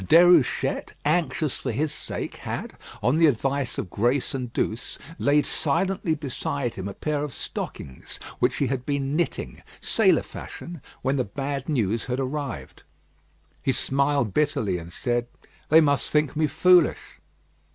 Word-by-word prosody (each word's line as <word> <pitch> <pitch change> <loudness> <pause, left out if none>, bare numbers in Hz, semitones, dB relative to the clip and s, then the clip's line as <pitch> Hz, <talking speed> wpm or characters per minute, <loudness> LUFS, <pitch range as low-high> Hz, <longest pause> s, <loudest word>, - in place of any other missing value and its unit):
Déruchette, 170 - +4
anxious 155 -2 +1
for 125 - -3
his 150 +6 -1
sake, - - -5
had, - - -5 0.3
on 125 +8 +3
the 165 - +7
advice 135 0 0
of 90 - -4
Grace 125 +7 +1
and 125 -3 -3
Douce, 115 0 -2 0.2
laid 145 +1 +3
silently 165 +2 +1
beside 140 -3 -3
him 95 0 -5
a 100 - -6
pair 150 -1 -1
of 150 - -4
stockings, 65 -2 -6 0.2
which - - +2
he 140 - +1
had 130 0 -2
been 140 0 -1
knitting, 170 0 -2 0.2
sailor - - +3
fashion, 170 -3 -8 0.2
when 135 +2 +1
the 130 - +2
bad 135 +5 -4
news 115 -6 0
had 125 0 -2
arrived. 135 - -4 0.8
He 135 - +1
smiled 140 -6 +1
bitterly, 140 - +1
and 85 0 -10
said: 120 +5 -1 0.4
"They 160 +2 +8
must 145 -3 +2
think 150 -1 +1
me 155 0 +2
foolish." 180 0 +3
140 Hz, 150 wpm, -25 LUFS, 120-150 Hz, 0.8 s, They